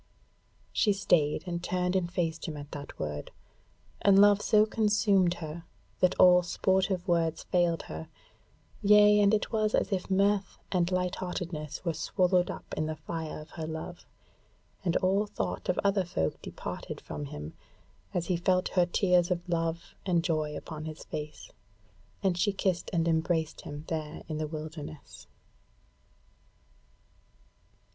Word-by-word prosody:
She 210 - +3
stayed, 175 -6 +2
and 170 -1 -3
turned 180 0 0
and 175 -2 0
faced 165 -2 -2
him 155 -2 -5
at 145 0 -9
that 145 -1 -8
word; 75 -1 -4 0.7
and 200 -1 +5
love 205 0 +6
so 215 0 +4
consumed 210 -5 +2
her, 165 0 -7 0.4
that 185 0 +3
all 180 -1 +7
sportive 185 +1 0
words 165 -2 +1
failed 175 -2 +1
her; 80 +1 -7 0.7
yea 210 0 +7
and 200 -1 +5
it 215 -1 0
was 215 -1 +2
as - - 0
if 190 -1 -2
mirth 200 +1 +2
and 180 -1 +1
light 180 0 0
heartedness 170 -4 -5
were 170 - +1
swallowed 180 +2 +1
up - - -7
in 155 - -1
the 155 - -3
fire 160 +1 -5
of 150 +1 -12
her 160 -2 -5
love; 160 +2 -7 0.8
and 175 -3 +2
all 195 +3 +2
thought 90 - -4
of 180 - +1
other 200 -1 +3
folk 80 - -2
departed - - -6
from 75 -1 -6
him 75 +2 -7 0.6
as 175 - -1
he 180 0 0
felt 185 +1 +1
her 180 -2 +2
tears 180 -1 +3
of 180 0 -2
love 165 0 -2
and 175 -3 +1
joy 155 -3 -1
upon 155 -1 -7
his 155 -1 -7
face, 150 - -7 0.7
and 180 -2 +1
she 205 +3 +3
kissed 190 -2 -1
and 170 -2 +1
embraced 160 -1 0
him 145 +1 -8
there 155 -1 -4
in 155 -1 -3
the 155 - -1
wilderness. 155 -2 -8
175 Hz, 150 wpm, -29 LUFS, 155-190 Hz, 0.8 s, all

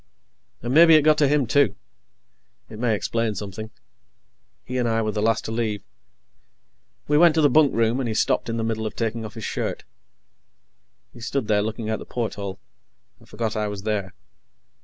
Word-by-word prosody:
And 120 +2 -2
maybe 165 +1 +8
it 155 - +5
got 155 0 +4
to 145 - +4
him, 145 -1 +2
too. 140 +4 +2 1.0
It 110 - -9
may 115 -2 +1
explain 115 +1 -1
something. 105 +2 -6 0.9
He 125 0 -3
and 120 -1 +1
I 115 0 +1
were 110 - -1
the 105 - -2
last 115 +1 +1
to - - -4
leave. 110 -3 -2 1.2
We 150 0 +3
went 170 -2 +6
to 160 - +3
the 145 -3 +4
bunkroom, 125 -5 +3
and 130 - -1
he 110 - -2
stopped - - +1
in 115 - -2
the 115 - -1
middle 110 -1 -2
of - - -7
taking 115 0 -2
off 110 - -9
his 115 - -6
shirt. - - -3 1.3
He 120 - -13
stood 120 0 -3
there, 105 -1 +2
looking 110 +1 -4
out 110 - -2
the - - -9
porthole, 100 -5 -4 0.6
and - - -21
forgot 110 0 -3
I 105 -1 -1
was 100 -1 -6
there. 105 -3 -2
115 Hz, 190 wpm, -23 LUFS, 110-125 Hz, 1.3 s, maybe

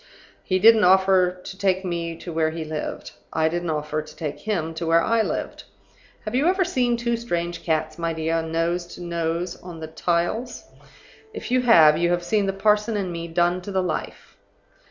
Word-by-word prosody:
He 185 - +1
didn't 220 +2 +6
offer 185 -1 +4
to 190 - -8
take 190 -1 +1
me 170 -2 -3
to 170 0 -8
where 160 -1 +1
he 160 0 -5
lived. 155 -1 -5 0.2
I 160 0 +1
didn't 175 +1 -2
offer 150 0 -2
to 155 0 -13
take 150 -2 -5
him 165 -5 -2
to 165 +1 -4
where 165 0 +4
I 230 0 +2
lived. - - -4 0.6
Have 215 - -4
you 270 +6 +2
ever 370 0 +2
seen 250 -9 +1
two 235 0 0
strange 175 -7 -3
cats, 155 0 -1
my 165 0 -1
dear, 165 0 -1
nose 165 +2 -1
to - - -11
nose 170 +1 -2
on 175 -2 -10
the 160 - -5
tiles? 175 +9 -2 0.7
If - - -6
you 255 0 +3
have, 160 -11 +6
you 170 0 +2
have 175 0 0
seen 200 +2 +1
the - - +1
parson 210 +2 +1
and 190 -3 -2
me 170 0 -5
done 175 +2 +1
to 200 - -7
the 190 -1 0
life. 175 -4 -5
175 Hz, 195 wpm, -23 LUFS, 165-200 Hz, 0.7 s, didn't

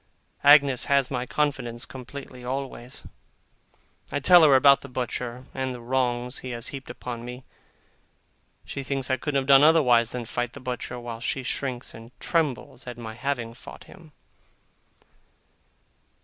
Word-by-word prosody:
Agnes 140 -3 +6
has 140 -2 +2
my 125 -1 -2
confidence 125 -6 -1
completely, 130 0 -10
always; 130 -1 -5 1.1
I 145 - -1
tell 175 +5 +7
her 155 - +7
all 135 - +7
about 140 +1 +6
the 140 - -10
butcher, 125 0 -4
and 130 -1 -3
the - - -8
wrongs 125 +1 -1
he 130 - -7
has 120 -2 -4
heaped 135 -2 -8
upon 120 -2 -6
me; 125 +2 -8 1.2
she 140 - -5
thinks 135 -1 -2
I 130 - +2
couldn't 140 +1 0
have 135 - -4
done 135 0 +7
otherwise 130 -7 +5
than 125 -1 -5
fight 120 +1 -3
the - - -9
butcher, 125 -1 -5
while 120 -1 -7
she 130 +3 -2
shrinks 130 -1 -4
and 115 +1 -11
trembles 145 -6 -2
at 120 -1 -6
my 110 -2 -7
having 120 -2 -3
fought 120 - -12
him. 165 -5 -16
130 Hz, 155 wpm, -26 LUFS, 120-140 Hz, 1.2 s, tell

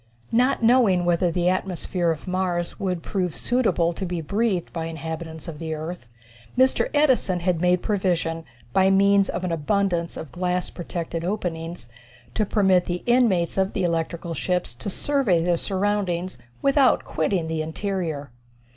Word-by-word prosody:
Not 250 +2 +2
knowing 225 -7 +4
whether 175 0 +2
the 175 +1 0
atmosphere 180 -1 0
of 160 +2 -3
Mars 180 -2 -1
would 180 -4 -2
prove 180 -5 -2
suitable 225 -9 +1
to 190 - -6
be 175 -2 -2
breathed 195 +2 -1
by 165 -1 -3
inhabitants 160 0 -6
of 155 -3 -7
the 160 -1 -3
earth, 155 -4 -6 0.5
Mr. 260 +1 +3
Edison 260 - +2
had 175 -2 0
made 180 0 +2
provision, 175 -5 0 0.3
by 190 0 +4
means 200 0 +4
of - - -3
an 180 - -1
abundance 170 +1 0
of 155 - -7
glass 180 +2 -1
protected 170 -1 -5
openings, 170 - -4 0.5
to 215 - 0
permit 190 -4 +3
the 175 0 -3
inmates 225 -9 +2
of 190 0 +1
the 190 - -1
electrical 170 0 -2
ships 180 -3 -1
to 130 +11 -6
survey 250 -5 +2
their 175 +1 +2
surroundings 190 -1 -1 0.2
without 275 -1 +4
quitting 160 +1 -1
the 160 -1 -2
interior. 160 - -3
180 Hz, 155 wpm, -24 LUFS, 165-195 Hz, 0.5 s, knowing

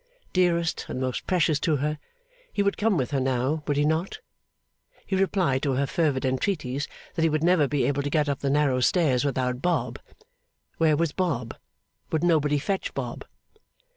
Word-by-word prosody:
Dearest 170 -3 +1
and - - -3
most 130 -1 -3
precious 165 -5 +2
to 155 0 +1
her, 150 +2 -2 0.5
he 200 - 0
would 200 - +1
come 210 -3 +1
with 130 -3 -1
her 140 - +1
now, 130 +4 0
would 145 -2 0
he 145 - +3
not? 160 +4 0 0.9
He 190 - -1
replied 185 -8 +1
to 140 -2 0
her 140 +2 +1
fervid 140 -3 0
entreaties, 135 0 -1 0.3
that 165 - -2
he 165 - +4
would 155 0 0
never 175 -4 +4
be 145 0 0
able 140 0 0
to 145 - -2
get 150 0 +1
up 140 -2 -1
the 140 - -1
narrow 140 -2 +2
stairs 135 -2 +2
without 130 -3 -1
Bob; 175 +2 -1 0.8
where 155 -2 +4
was 165 -1 +1
Bob, 140 -11 -2 0.6
would 160 +1 0
nobody 150 -4 +3
fetch 190 +7 -2
Bob? - - -5
150 Hz, 180 wpm, -26 LUFS, 135-170 Hz, 0.9 s, he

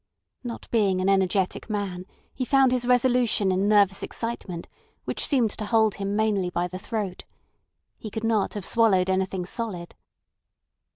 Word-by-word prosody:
Not 240 -2 -7
being 200 -5 +2
an 185 +1 +1
energetic 190 +1 +1
man, 195 -3 -3 0.3
he 255 - -3
found 265 0 +4
his 250 -1 0
resolution 245 -5 +3
in 190 +2 +1
nervous 200 -2 +4
excitement, 215 -7 -5 0.4
which - - 0
seemed 245 -7 +2
to 215 - -5
hold 220 -1 +3
him 200 0 -2
mainly 210 -4 +1
by 175 0 -1
the 185 +1 -7
throat. 205 -3 -4 0.8
He 215 - -7
could 220 +1 -5
not 225 -3 +1
have 205 -3 -5
swallowed 190 -5 +3
anything 190 -1 -1
solid. 190 -4 -5
205 Hz, 155 wpm, -25 LUFS, 190-230 Hz, 0.8 s, found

